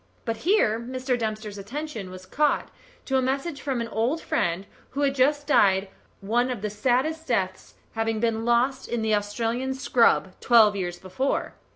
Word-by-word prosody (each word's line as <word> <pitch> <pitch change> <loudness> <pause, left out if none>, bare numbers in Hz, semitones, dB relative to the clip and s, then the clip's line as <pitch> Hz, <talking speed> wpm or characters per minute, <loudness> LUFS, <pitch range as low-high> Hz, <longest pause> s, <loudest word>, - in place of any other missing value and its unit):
But 230 -2 -2
here 235 - +2
Mr. 255 +2 -2
Dempster's 215 -3 -4
attention 235 -1 -6
was 185 0 -10
called 295 +10 0 0.3
to 265 - +1
a - - +3
message 275 +3 -2
from 265 -4 -2
an 230 - -3
old 235 +10 0
friend 175 - -1 0.2
who 280 - -4
had 280 -1 +2
just 290 +2 +2
died 195 -9 +3 0.3
one 240 +5 +1
of 240 -5 -4
the 210 - -2
saddest 260 +9 +1
of 320 - -22
deaths, 190 -5 -2 0.2
having 225 -1 -1
been 225 -1 0
lost 240 +3 +1
in 235 -2 -2
the 220 -1 +1
Australian 230 +5 -1
scrub 235 -7 +3
twelve 220 -4 +5
years 175 -3 -3
before. 225 +10 -2
235 Hz, 175 wpm, -25 LUFS, 210-265 Hz, 0.3 s, twelve